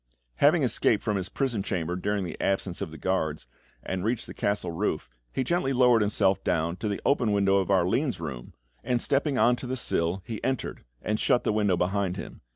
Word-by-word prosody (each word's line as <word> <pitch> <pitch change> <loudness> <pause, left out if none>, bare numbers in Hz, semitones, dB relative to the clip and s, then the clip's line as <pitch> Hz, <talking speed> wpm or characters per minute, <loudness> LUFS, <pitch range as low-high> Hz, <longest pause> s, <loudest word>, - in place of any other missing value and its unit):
Having - - +4
escaped - - +2
from 105 - 0
his 95 -2 -2
prison 120 -3 -1
chamber 90 -3 -2
during 100 +2 -1
the 85 - -6
absence 95 -2 -1
of - - -3
the 80 - -10
guards, 80 -3 -1 0.4
and 95 -1 -3
reached 120 +2 -1
the - - -9
castle 100 -4 -1
roof, 80 -5 -2 0.2
he 130 - -1
gently 135 -2 0
lowered 125 -3 +5
himself 100 -2 +2
down 85 +2 0
to 110 - -3
the 100 - -2
open 125 -6 +2
window 100 -1 +3
of 95 -1 0
Arline's 95 - +2
room, 65 -7 -6 0.3
and 125 0 +1
stepping 140 +2 +1
on 125 0 +4
to 125 - -7
the 130 +1 -2
sill, 85 -4 0
he 110 -3 -6
entered, 130 -1 -2 0.2
and 105 0 -1
shut 120 - +2
the - - +1
window 105 -4 +2
behind 95 +1 0
him. - - -8
100 Hz, 205 wpm, -27 LUFS, 90-120 Hz, 0.4 s, lowered